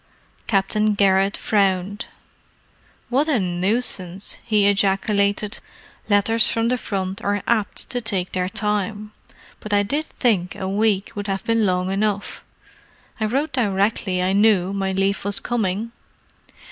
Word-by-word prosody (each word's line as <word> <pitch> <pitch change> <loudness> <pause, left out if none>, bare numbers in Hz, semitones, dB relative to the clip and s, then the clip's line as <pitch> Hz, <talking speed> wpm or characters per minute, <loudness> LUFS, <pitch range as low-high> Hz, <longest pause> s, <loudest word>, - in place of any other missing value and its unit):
Captain 210 +1 +1
Garrett 195 0 +3
frowned. 195 -1 0 1.0
"What 275 +5 +2
a 275 -6 +3
nuisance!" 185 0 -1
he 215 -3 +2
ejaculated. 200 +1 +1 0.5
"Letters 215 +2 +4
from 230 0 +1
the 250 - +1
front 190 -2 -3
are 205 -1 -1
apt 220 -3 0
to 245 - -2
take 195 -5 -2
their 185 0 -1
time, 210 0 -2 0.5
but 210 -1 -2
I 205 - +3
did 290 +10 -1
think 200 - 0
a 190 - -4
week 205 +1 +1
would 205 -2 -5
have 195 -1 -2
been 230 -2 +2
long 185 0 0
enough. 205 0 -2 0.8
I 220 - 0
wrote 275 +7 -1
directly 200 -5 0
I 185 +1 +1
knew 200 -2 +3
my 195 -1 -1
leave 195 +1 0
was 200 0 -2
coming. 220 -1 -2
205 Hz, 135 wpm, -22 LUFS, 195-220 Hz, 1.0 s, Letters